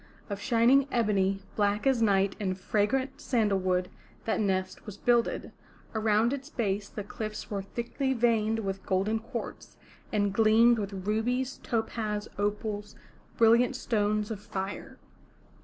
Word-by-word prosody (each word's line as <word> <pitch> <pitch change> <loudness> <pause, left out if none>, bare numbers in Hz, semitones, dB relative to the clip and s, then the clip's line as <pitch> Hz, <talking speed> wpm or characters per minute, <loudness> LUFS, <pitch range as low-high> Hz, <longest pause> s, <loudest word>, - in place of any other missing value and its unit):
Of 200 - -3
shining 255 +3 +4
ebony, 195 -4 +1
black 205 +1 +1
as 265 -3 +3
night 195 -2 +3
and 185 -3 -1
fragrant 225 +8 0
sandal 215 -6 +1
wood 185 -1 0 0.4
that 225 - 0
nest 190 -3 -1
was 205 -1 -7
builded; 240 +1 +1 0.4
around 220 +2 +2
its 280 +1 -5
base 205 -7 -2
the 210 - -6
cliffs 215 +1 -6
were 200 -1 -1
thickly 240 +6 -2
veined 225 -2 +2
with 195 -1 -3
golden 195 +4 0
quartz, 230 +1 -7 0.3
and 205 -2 +1
gleamed 225 +2 +5
with 195 -2 -5
rubies, 245 +5 -1
topaz, 215 -2 -2
opals, 210 0 -2 0.4
brilliant 230 +2 +5
stones 210 -1 0
of 215 - -4
fire. 195 -2 -6
215 Hz, 135 wpm, -29 LUFS, 200-235 Hz, 0.4 s, gleamed